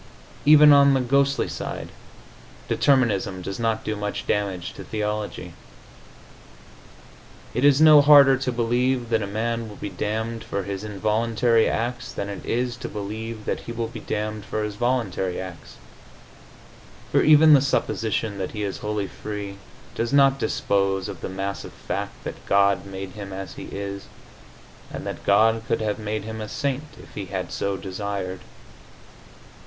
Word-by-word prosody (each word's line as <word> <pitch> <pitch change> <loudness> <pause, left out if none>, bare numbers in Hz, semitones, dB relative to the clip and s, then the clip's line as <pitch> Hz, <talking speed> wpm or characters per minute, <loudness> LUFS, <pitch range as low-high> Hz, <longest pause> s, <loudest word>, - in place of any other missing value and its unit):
Even 150 -1 +9
on 140 -1 +6
the - - +2
ghostly 140 +2 +2
side, - - -5 0.8
determinism 105 -9 +2
does 95 +4 -5
not 115 -1 0
do 110 - -2
much 105 0 -4
damage 95 -4 -2
to - - -9
theology. 105 -1 -4 2.0
It 125 - -1
is 145 -1 +6
no 155 -2 +8
harder 140 -2 +8
to 130 0 -2
believe 120 +1 0
that 115 -1 +2
a 100 - -3
man 115 +2 -2
will 105 - -10
be 100 - -6
damned 110 +4 -3
for 100 -2 -3
his 100 +1 -5
involuntary 110 +3 +1
acts 120 0 -3
than 100 - -4
it 100 - -7
is 120 0 -1
to - - -6
believe 110 +2 -6
that - - -1
he - - -8
will 115 -1 -3
be - - -8
damned 105 0 -3
for 110 +1 -3
his 105 -1 -3
voluntary 105 -6 -1
acts, 90 -3 -9 1.4
for - - +4
even 155 0 +7
the 140 - +7
supposition 110 -6 -1
that 95 - -4
he 105 -2 -3
is 100 -2 -3
wholly 105 -1 -2
free 100 0 -6 0.4
does 115 +2 -2
not 135 -1 +5
dispose 95 -4 0
of 95 -4 -8
the - - -4
massive 95 +1 -5
fact - - -5
that - - -7
God 100 -1 +3
made 95 -1 -7
him 100 -1 -8
as 95 -2 -6
he - - -8
is, 100 0 -6 0.9
and - - -6
that - - -6
God 110 +3 +4
could - - +1
have 105 -1 -1
made 105 -1 -3
him 110 0 -6
a 105 - -6
saint 140 +3 -2
if - - -14
He 100 - -5
had 95 -2 -4
so 100 -1 -2
desired. 95 -1 -4
110 Hz, 160 wpm, -24 LUFS, 100-120 Hz, 2.0 s, Even